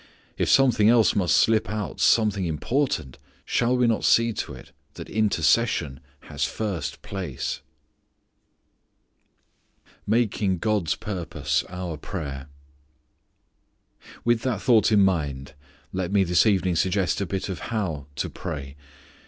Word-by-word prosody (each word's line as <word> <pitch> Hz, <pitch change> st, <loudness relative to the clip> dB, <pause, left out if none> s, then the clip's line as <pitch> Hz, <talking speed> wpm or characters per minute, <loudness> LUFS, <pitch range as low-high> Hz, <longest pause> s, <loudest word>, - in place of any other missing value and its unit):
If -, -, -1 dB
something 120 Hz, -6 st, +5 dB
else 115 Hz, -2 st, +4 dB
must 90 Hz, -5 st, +3 dB
slip 110 Hz, 0 st, +3 dB
out, 105 Hz, -1 st, -4 dB
something 105 Hz, -4 st, +3 dB
important, 80 Hz, -, -2 dB, 0.3 s
shall 125 Hz, +1 st, +1 dB
we 125 Hz, -, +3 dB
not 115 Hz, -2 st, +1 dB
see 115 Hz, 0 st, +4 dB
to -, -, -5 dB
it -, -, -14 dB, 0.2 s
that -, -, -8 dB
intercession 105 Hz, -, +1 dB, 0.2 s
has -, -, -5 dB
first 100 Hz, -8 st, -3 dB
place! 90 Hz, -9 st, -4 dB, 2.5 s
Making 105 Hz, -4 st, +1 dB
God's 100 Hz, -4 st, 0 dB
Purpose 85 Hz, -7 st, -2 dB
Our 90 Hz, -3 st, -5 dB
Prayer. 70 Hz, -5 st, -6 dB, 1.8 s
With 120 Hz, -1 st, +2 dB
that 125 Hz, -6 st, -1 dB
thought 115 Hz, -3 st, +4 dB
in 105 Hz, -2 st, +5 dB
mind 75 Hz, -8 st, 0 dB, 0.4 s
let 95 Hz, -1 st, -2 dB
me 100 Hz, -1 st, +4 dB
this 90 Hz, +3 st, +3 dB
evening 95 Hz, -4 st, +2 dB
suggest 95 Hz, 0 st, +1 dB
a 100 Hz, -, -2 dB
bit 95 Hz, +1 st, -3 dB
of 95 Hz, -3 st, -5 dB
how 85 Hz, -11 st, -3 dB
to -, -, -2 dB
pray. 70 Hz, -1 st, -6 dB
95 Hz, 125 wpm, -25 LUFS, 85-110 Hz, 2.5 s, something